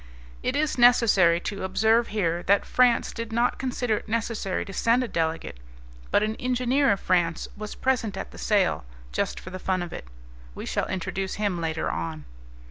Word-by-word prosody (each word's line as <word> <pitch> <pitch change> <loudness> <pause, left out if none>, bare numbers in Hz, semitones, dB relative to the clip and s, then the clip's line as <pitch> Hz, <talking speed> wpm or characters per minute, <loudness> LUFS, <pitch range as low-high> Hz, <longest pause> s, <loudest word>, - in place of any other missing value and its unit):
It 255 - -1
is 295 -3 0
necessary 210 -8 +5
to 200 0 -4
observe 220 +5 +2
here 175 -5 -1
that 200 +1 +4
France 250 -2 +3
did 230 -1 -6
not 235 +2 +1
consider 245 -4 -1
it - - -9
necessary 225 -4 -2
to 195 - -9
send 235 +5 +2
a - - -3
delegate, 160 - -2 0.5
but 205 - +3
an 215 +1 -1
engineer, 255 +2 +2
of 200 - +1
France, 175 -2 +1
was 210 0 -7
present 230 -6 0
at - - -6
the - - -12
sale, 200 - +1 0.3
just - - -2
for 185 - -10
the 185 - -6
fun 185 -1 -1
of 175 - -7
it. - - -8 0.5
We - - -6
shall - - -1
introduce 190 +1 -3
him 200 -5 -1
later 160 -1 -1
on. 80 -3 -4
205 Hz, 185 wpm, -26 LUFS, 180-235 Hz, 0.5 s, necessary